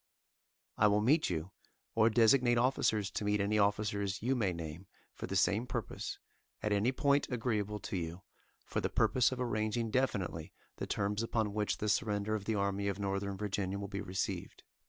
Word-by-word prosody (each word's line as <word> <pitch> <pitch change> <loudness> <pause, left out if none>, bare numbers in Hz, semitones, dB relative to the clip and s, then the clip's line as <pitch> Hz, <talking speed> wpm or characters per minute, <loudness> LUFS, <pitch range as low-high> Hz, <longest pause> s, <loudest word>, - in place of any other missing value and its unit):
I 105 - +6
will 105 0 +3
meet 150 +8 +3
you, 85 +1 -3 0.4
or 115 0 +4
designate 120 +2 +4
officers 110 -5 +2
to - - -3
meet 105 0 +1
any 105 +2 +1
officers 100 -1 0
you 130 +3 +2
may 105 -7 +1
name 85 +2 -7 0.3
for - - -6
the - - -3
same 110 +5 +2
purpose, 120 -4 -4 0.5
at 105 - 0
any 105 +5 +3
point 140 +1 +2
agreeable 110 -4 -1
to - - -4
you, 85 0 -4 0.4
for - - -2
the - - 0
purpose 115 +3 +3
of 130 - -4
arranging 110 -1 -1
definitely 100 -11 -1 0.2
the - - -4
terms 105 +1 -1
upon 110 -2 -1
which 105 -1 0
the 105 - -2
surrender 105 0 0
of 105 -2 -2
the 110 - 0
Army 100 0 0
of 100 - -1
Northern 100 -1 -2
Virginia 100 -1 -2
will 100 0 -4
be 100 0 -4
received. 95 -2 -4
105 Hz, 180 wpm, -33 LUFS, 100-115 Hz, 0.5 s, I